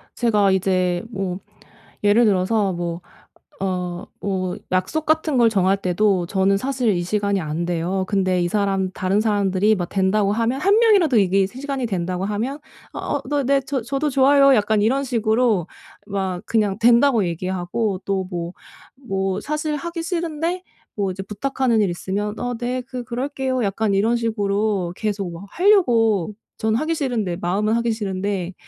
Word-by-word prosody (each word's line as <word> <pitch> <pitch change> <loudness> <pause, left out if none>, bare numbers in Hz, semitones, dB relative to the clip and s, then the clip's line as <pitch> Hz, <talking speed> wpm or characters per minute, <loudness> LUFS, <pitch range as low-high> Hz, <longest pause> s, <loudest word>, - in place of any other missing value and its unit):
제가 210 -5 +2
이제 185 -2 +1
뭐 190 -3 -3 0.6
예를 210 +4 +5
들어서 195 0 +2
뭐 170 0 -4 0.6
어 180 -1 -3
뭐 185 -2 -2 0.2
약속 185 +13 0
같은 315 -2 +1
걸 230 -1 +5
정할 195 -2 +2
때도 185 -1 +1
저는 195 +1 +2
사실 255 0 0
이 175 -1 -1
시간이 200 +1 0
안 155 +1 -3
돼요. 180 +2 -1
근데 185 -3 +1
이 - - +1
사람, 195 -1 0
다른 190 +3 0
사람들이 205 -1 +2
막 175 -2 -3
된다고 200 +1 +1
하면 230 +5 0
1 395 +3 +4
명이라도 380 - +4
이게 195 -1 +3
세 255 +4 -11
시간이 275 -3 -2
된다고 185 -2 -2
하면 225 +8 -2 0.4
"어 - - -2
너 290 -1 +1
네. 275 +1 +3
저 270 -3 -2
저도 275 +5 -1
좋아요." 275 +1 +5
약간 215 0 +2
이런 265 +6 +2
식으로 225 - +1 0.4
막 190 -3 -2
그냥 210 -3 +1
된다고 235 -1 +5
얘기하고 185 +4 -2
또 195 -1 -1
뭐 170 0 -4 0.6
뭐 195 0 -1
사실 305 +4 -2
하기 335 +2 -5
싫은데 335 +1 -2 0.3
뭐 200 -2 0
이제 190 +1 -6
부탁하는 235 +2 0
일이 195 - +1
있으면 205 +4 -3
"어 245 0 -2
네. 250 +1 -2
그 250 0 -6
그럴게요." 260 0 -2
약간 200 +1 0
이런 220 +4 +2
식으로 205 -4 -1
계속 205 -4 -3
뭐 170 +4 -9
하려고 230 - +3 0.3
전 220 0 +1
하기 310 +6 0
싫은데, 230 - -1
마음은 200 +5 0
하기 235 0 0
싫은데 195 -3 -3
210 Hz, 310 characters per minute, -21 LUFS, 190-250 Hz, 0.6 s, 예를